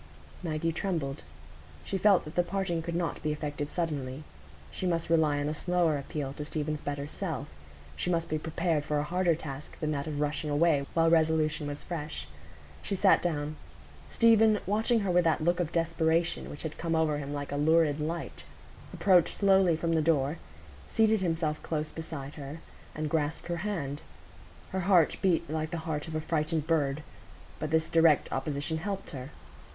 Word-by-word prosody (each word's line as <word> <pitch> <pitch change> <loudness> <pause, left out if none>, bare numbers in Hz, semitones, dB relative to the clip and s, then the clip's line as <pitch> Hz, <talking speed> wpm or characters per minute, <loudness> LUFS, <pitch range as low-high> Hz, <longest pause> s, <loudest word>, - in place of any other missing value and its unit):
Maggie 165 -1 -1
trembled. 160 -6 -2 0.6
She 195 - -2
felt 200 -1 +5
that 155 - -8
the 175 - +3
parting 175 -1 -1
could 170 +1 -4
not 170 -1 -2
be 155 - 0
effected 145 -1 -3
suddenly. 150 -5 -3 0.5
She 185 - -3
must 165 -1 -1
rely 155 -3 +3
on 145 - -1
a 150 - -1
slower 175 -1 +1
appeal 140 -1 -4
to 150 - -5
Stephen's 150 0 -3
better 145 0 -3
self; 160 -4 -4 0.5
she - - -2
must 170 -2 +1
be 155 - -1
prepared 160 -1 0
for 150 0 -1
a 145 - +1
harder 175 +1 +2
task 145 -2 -8
than 155 -1 -1
that 140 0 -2
of 150 -2 -3
rushing 150 +1 -1
away 145 -2 +3
while 165 0 +4
resolution 160 -2 +2
was 145 0 -5
fresh. 150 - -5 0.5
She 200 - -2
sat 195 +1 +5
down. 155 -3 -2 0.5
Stephen, 225 -2 +5
watching 220 +3 +2
her 195 -2 0
with 175 0 +4
that 160 -1 +2
look 175 +2 +2
of 170 -2 -1
desperation 165 0 +1
which 145 - -8
had 160 -1 -5
come 165 -1 0
over 155 -2 +2
him 140 -1 -5
like 145 -1 -4
a - - -2
lurid 155 0 +3
light, 165 +3 -4 0.5
approached 180 -4 +3
slowly 190 -4 +4
from 165 +1 -1
the 160 - +3
door, 150 -1 +1 0.5
seated 220 -2 +3
himself 165 -3 -1
close 155 -1 -2
beside 155 -3 -6
her, 145 0 -7 0.4
and 155 0 -2
grasped 155 +2 -1
her 170 - -1
hand. 165 -7 -3 0.7
Her 190 - -1
heart 180 -3 +4
beat 170 -3 +2
like 155 0 -2
the 170 - -3
heart 155 -1 -2
of 160 - -5
a 155 - 0
frightened 155 -1 -1
bird; 150 -2 +1 0.6
but 155 - -3
this 160 +1 +2
direct 165 -2 +4
opposition 145 +4 -2
helped 195 +3 -4
her. 135 -2 -7
160 Hz, 180 wpm, -29 LUFS, 150-170 Hz, 0.7 s, felt